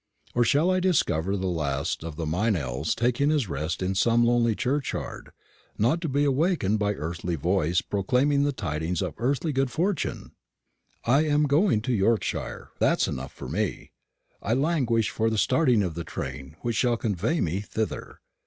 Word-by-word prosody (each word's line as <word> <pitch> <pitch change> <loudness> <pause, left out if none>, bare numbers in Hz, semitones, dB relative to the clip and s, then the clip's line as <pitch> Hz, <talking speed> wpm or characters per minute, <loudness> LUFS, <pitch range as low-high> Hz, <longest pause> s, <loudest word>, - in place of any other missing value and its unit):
or 120 - +3
shall 150 +9 +3
I 185 - +2
discover 100 - +1
the 95 - -3
last 75 -3 -1
of 80 -2 -6
the 80 +1 -3
Meynells 80 - 0
taking 125 +4 +1
his 150 -7 +1
rest 80 +3 -3
in 95 +1 0
some 115 +4 +3
lonely 120 -2 +3
churchyard, 135 +5 -3 0.5
not 140 +11 +2
to 165 - -2
be 140 +2 +1
awakened 140 - +1
by 105 0 0
earthly 85 +1 -3
voice 90 +2 +1
proclaiming 130 +8 +1
the 145 0 +2
tidings 85 - -2
of 90 -5 -3
earthly 140 +5 0
good 135 0 +1
fortune? 175 +5 -2 0.7
I 140 +6 +4
am 150 0 +2
going 150 - +3
to 125 +3 -1
Yorkshire 110 +1 -1
that - - +3
is - - +2
enough 65 +1 -5
for - - -9
me. - - -3 0.5
I 110 +4 0
languish 130 -7 +1
for 110 0 +1
the 110 - -1
starting 120 - +3
of 90 -3 -2
the 85 +1 -5
train 70 -2 -6
which 120 -3 -2
shall 120 0 +2
convey 110 - -1
me 85 +3 0
thither. 110 +1 -4
115 Hz, 170 wpm, -26 LUFS, 90-140 Hz, 0.7 s, I